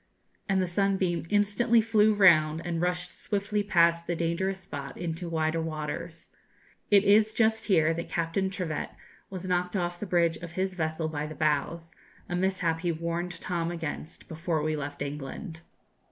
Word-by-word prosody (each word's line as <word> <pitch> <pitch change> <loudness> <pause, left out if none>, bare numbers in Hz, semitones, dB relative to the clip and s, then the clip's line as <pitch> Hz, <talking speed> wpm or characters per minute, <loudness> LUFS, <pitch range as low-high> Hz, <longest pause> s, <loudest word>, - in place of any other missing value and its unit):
and 195 -1 +3
the 185 - +2
'Sunbeam' 180 -3 0
instantly 210 +3 +3
flew 220 -1 +4
round 160 -6 +5
and 170 -1 -2
rushed 180 0 -1
swiftly 205 0 -1
past 170 -4 +3
the 175 - 0
dangerous 180 +4 -1
spot 140 -5 -7
into 170 0 -4
wider 160 0 0
waters. 160 +2 -5 0.6
It 205 -1 +6
is 210 +2 +5
just 220 -1 +1
here 165 -5 +4
that 170 +1 -5
Captain 170 +3 0
Trivett 180 -5 -3 0.4
was 185 -1 -6
knocked 180 +1 0
off 175 -2 -2
the 210 - -5
bridge 170 -2 +2
of 170 -1 -9
his 190 +1 -1
vessel 160 -2 -2
by 150 -1 -3
the 155 - -8
boughs 155 +3 -1 0.3
a 175 - -3
mishap 180 -3 0
he 175 0 0
warned 170 +2 -3
Tom 170 -2 -2
against 165 -1 -6
before 160 -1 -2
we 155 0 0
left 145 -1 -4
England. 150 +5 -6
170 Hz, 165 wpm, -28 LUFS, 160-190 Hz, 0.6 s, It